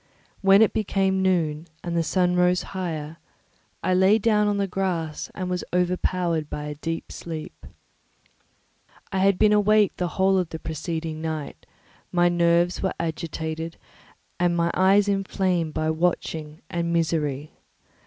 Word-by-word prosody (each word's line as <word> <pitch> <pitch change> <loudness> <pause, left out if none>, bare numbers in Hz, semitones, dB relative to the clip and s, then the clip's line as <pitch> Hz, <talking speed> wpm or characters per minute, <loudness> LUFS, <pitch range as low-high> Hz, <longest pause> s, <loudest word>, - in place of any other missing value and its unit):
When 195 +2 +6
it 220 - +2
became 195 -2 +1
noon, 165 -4 0 0.2
and 170 -1 -3
the 170 - +2
sun 180 +2 +1
rose 180 0 +3
higher, 165 -4 -4 0.7
I 185 - +2
lay 190 +3 +5
down 210 -1 +2
on 205 -1 +1
the 200 - +1
grass 175 -5 -3
and 185 -2 -3
was 180 -1 -2
overpowered 180 -3 0
by 150 - -5
a 150 0 -4
deep 165 +3 -5
sleep. 160 -2 -8 1.4
I 190 - -1
had 195 0 +3
been 210 +1 +4
awake 210 0 +4
the 180 - -1
whole 190 0 +4
of 180 -3 -2
the 160 - -5
preceding 160 0 -4
night, 160 -2 -5 0.4
my 175 0 +3
nerves 170 0 +2
were 190 - -1
agitated, 160 0 -4 0.6
and 175 -1 +2
my 170 0 +1
eyes 195 +2 +4
inflamed 190 -4 0
by 155 0 0
watching 160 -2 -2
and 170 0 -2
misery. 155 -4 -1
175 Hz, 145 wpm, -24 LUFS, 160-190 Hz, 1.4 s, When